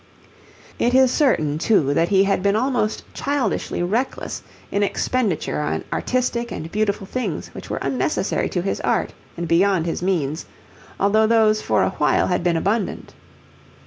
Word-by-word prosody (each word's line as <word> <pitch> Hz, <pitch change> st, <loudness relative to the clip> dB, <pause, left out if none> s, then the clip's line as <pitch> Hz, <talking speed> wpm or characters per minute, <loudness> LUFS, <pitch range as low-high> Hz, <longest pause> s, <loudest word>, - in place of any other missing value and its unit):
It 245 Hz, +2 st, +2 dB
is 260 Hz, -1 st, +5 dB
certain, 155 Hz, -, +1 dB
too, 160 Hz, -7 st, +2 dB
that 165 Hz, +4 st, +2 dB
he 195 Hz, -1 st, +4 dB
had 195 Hz, -1 st, +1 dB
been 200 Hz, +1 st, +2 dB
almost 235 Hz, -2 st, 0 dB
childishly 275 Hz, -10 st, -1 dB
reckless 225 Hz, +9 st, -2 dB, 0.3 s
in 200 Hz, -, 0 dB
expenditure 205 Hz, -4 st, 0 dB
on 150 Hz, -, -2 dB
artistic 240 Hz, -2 st, -1 dB
and 160 Hz, +1 st, -6 dB
beautiful 205 Hz, -2 st, -1 dB
things 205 Hz, -7 st, -4 dB
which -, -, -9 dB
were -, -, -2 dB
unnecessary -, -, -1 dB
to -, -, -2 dB
his -, -, -2 dB
art -, -, 0 dB, 0.2 s
and 170 Hz, 0 st, -3 dB
beyond 170 Hz, +1 st, +3 dB
his 170 Hz, -, -2 dB
means, 165 Hz, -5 st, -1 dB, 0.5 s
although 215 Hz, +2 st, +3 dB
those 215 Hz, -1 st, +3 dB
for -, -, +1 dB
a -, -, +1 dB
while 150 Hz, -6 st, +2 dB
had 180 Hz, -1 st, 0 dB
been 175 Hz, -2 st, +2 dB
abundant. 200 Hz, +5 st, -2 dB
200 Hz, 155 wpm, -21 LUFS, 170-230 Hz, 0.5 s, is